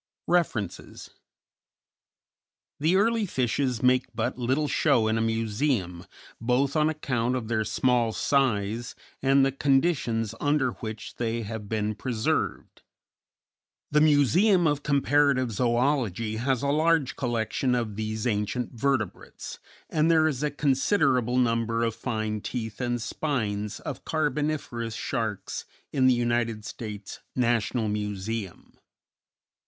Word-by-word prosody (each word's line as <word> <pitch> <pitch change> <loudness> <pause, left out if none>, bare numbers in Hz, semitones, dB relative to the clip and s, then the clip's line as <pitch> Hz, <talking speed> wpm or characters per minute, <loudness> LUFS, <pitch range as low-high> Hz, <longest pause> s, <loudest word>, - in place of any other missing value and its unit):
REFERENCES 150 - -1 1.7
_The 160 +4 +3
early 225 +1 +2
fishes 125 -3 -1
make 125 0 +4
but 120 +3 -1
little 130 +5 0
show 115 -4 +2
in 110 - +1
a 115 - +1
museum, 110 -5 -1 0.3
both 125 +4 +1
on 155 0 +3
account 130 -5 -1
of 120 -3 -4
their 110 -2 +1
small 120 0 +1
size 115 -3 0 0.3
and 135 0 +4
the 135 - +1
conditions 135 -5 +1
under 145 -3 +2
which 110 -1 -7
they 115 -1 -1
have 105 -1 -6
been 110 -1 -1
preserved. 110 +1 -2 1.1
The 150 0 +4
Museum 165 - +4
of 145 -2 +1
Comparative 140 -2 +2
Zoölogy 120 -2 0
has 130 +1 0
a 140 - +1
large 155 -1 +2
collection 120 +1 0
of 115 -4 -2
these 110 +1 -3
ancient 110 +2 -1
vertebrates, 120 -4 -3 0.3
and 155 +1 +1
there 160 -1 +5
is 140 -4 -2
a 150 - +1
considerable 135 - +2
number 115 -1 +1
of 115 -1 0
fine 110 -3 -3
teeth 110 0 -5
and 120 -1 -1
spines 110 -6 -2
of 140 - -6
Carboniferous 145 -6 -2
sharks 105 -4 -3 0.3
in 130 -2 +4
the 130 - +5
United 120 -2 0
States 105 -4 -7 0.2
National 120 -2 +1
Museum. 105 -1 -4
120 Hz, 120 wpm, -27 LUFS, 110-140 Hz, 1.7 s, there